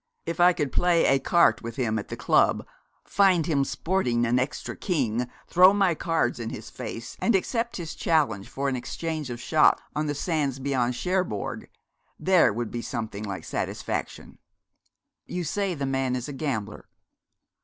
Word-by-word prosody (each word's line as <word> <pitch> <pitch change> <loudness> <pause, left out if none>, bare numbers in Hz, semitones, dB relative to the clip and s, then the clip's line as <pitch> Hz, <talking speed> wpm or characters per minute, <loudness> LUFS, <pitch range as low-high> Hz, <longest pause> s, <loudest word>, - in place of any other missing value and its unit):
If 165 0 -4
I 175 +1 +7
could 145 -6 -2
play 175 -2 +3
écarté 135 +6 +3
with 115 -1 -6
him 110 -4 0
at - - -7
the - - -6
club, - - +2 0.4
find 185 -5 +3
him 145 -4 +2
sporting 130 -8 0
an 120 +2 +2
extra 130 - -3
king, 125 - -1 0.2
throw 185 +2 +6
my 195 -4 +3
cards 160 -7 0
in 115 -1 -4
his 115 +2 -8
face, 115 0 -7
and 235 - +3
accept 230 +5 -1
his 170 -3 -5
challenge 130 -12 0
for 140 +1 -3
an 135 - 0
exchange 155 +3 -4
of 120 -1 -5
shots 155 +5 +4 0.2
on 150 0 -1
the 145 - -2
sands 145 -4 -1
beyond 130 -3 0
Cherbourg 180 - -2 0.5
there 180 -10 +4
would 115 +1 -4
be 120 - -3
something 110 -4 -5
like 100 -6 -5
satisfaction.' - - -4 0.9
'You 180 0 -3
say 195 +2 -1
the 140 -2 -3
man 135 -1 0
is 125 -1 -4
a 145 - -6
gambler?' 135 -7 -4
140 Hz, 165 wpm, -26 LUFS, 120-170 Hz, 0.9 s, I